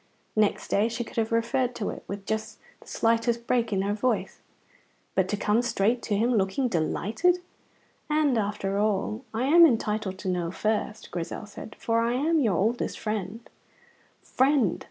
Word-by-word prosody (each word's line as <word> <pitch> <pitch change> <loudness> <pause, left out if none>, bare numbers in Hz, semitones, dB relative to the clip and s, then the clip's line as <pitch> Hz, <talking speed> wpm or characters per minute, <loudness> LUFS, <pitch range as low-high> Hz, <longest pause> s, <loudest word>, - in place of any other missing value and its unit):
Next 215 -1 +1
day 210 +3 +2
she 235 +1 -3
could - - -13
have 225 0 0
referred 240 +2 +1
to 215 - -2
it, - - -9
with 200 0 -6
just 220 0 -3 0.2
the - - -19
slightest 230 +1 +1
break 235 -2 +1
in 195 -1 +1
her 200 +1 0
voice. 230 +4 -1 0.7
But 190 -1 +2
to 210 - -1
come 210 +3 +2
straight 235 0 +1
to 210 - -1
him, 235 +4 +2
looking 205 +5 +1
delighted 220 - +1 0.7
"And, 300 -3 +2
after 200 -2 -1
all, 215 +3 0
I 225 +2 -2
am 330 +6 +7
entitled 215 - +2
to 190 - -7
know 175 -2 0
first," 215 +3 -2
Grizel 175 +4 -4
said, 205 +1 -10
"for 230 0 0
I 230 +1 +1
am 310 +6 +2
your 215 - +2
oldest 225 +6 0
friend." 215 +1 -4 0.8
Friend! 260 - +2
220 Hz, 170 wpm, -27 LUFS, 205-240 Hz, 0.8 s, am